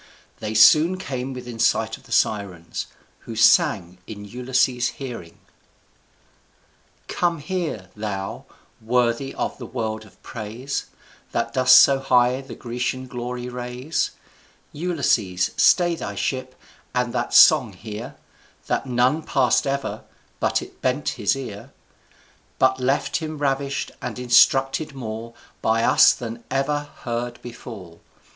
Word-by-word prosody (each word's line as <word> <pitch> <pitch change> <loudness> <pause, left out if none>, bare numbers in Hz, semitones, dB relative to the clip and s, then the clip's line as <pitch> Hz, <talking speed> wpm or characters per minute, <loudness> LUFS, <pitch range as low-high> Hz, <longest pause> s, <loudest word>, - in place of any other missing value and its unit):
They 110 0 -4
soon 155 +12 +6
came 135 -8 -4
within 125 -3 -8
sight - - +2
of - - -19
the - - -17
Sirens, 95 -6 -1 0.3
who 115 - -9
sang 95 -4 +3
in 105 -2 -8
Ulysses's 125 +2 0
hearing: 120 -11 -8 1.7
Come 175 -1 0
here, 150 - -4
thou, 100 -2 -5 0.4
worthy 120 +3 0
of - - -4
a - - -5
world 110 -3 -4
of 105 - -19
praise, 115 +5 -5 0.5
That - - -1
dost 130 0 +6
so 135 -1 +5
high 125 -1 +3
the 135 - -10
Grecian 125 +2 -3
glory 125 0 -5
raise, 125 +4 -3 0.6
Ulysses' 135 - 0
stay 175 -2 +4
thy 100 -11 -5
ship, 130 +4 -3 0.4
and 125 -1 0
that - - -2
song - - +6
hear 110 +1 -8 0.5
That - - -1
none 125 +5 +2
pass'd 135 -2 +2
ever, 140 0 -3 0.4
but - - +1
it - - -15
bent 130 +3 0
his 110 +1 0
ear, 120 -1 -8 0.9
But 130 0 +3
left 130 +2 0
him 155 -2 -5
ravish'd, 140 -1 -1
and 125 -1 -5
instructed 135 +4 +3
more 115 -2 -6 0.3
By 115 +1 +2
us 145 +5 +6
than 115 -2 -6
any 115 - -23
ever 145 +2 -1
heard 120 +1 -3
before. 105 -8 -10
125 Hz, 130 wpm, -23 LUFS, 110-135 Hz, 1.7 s, soon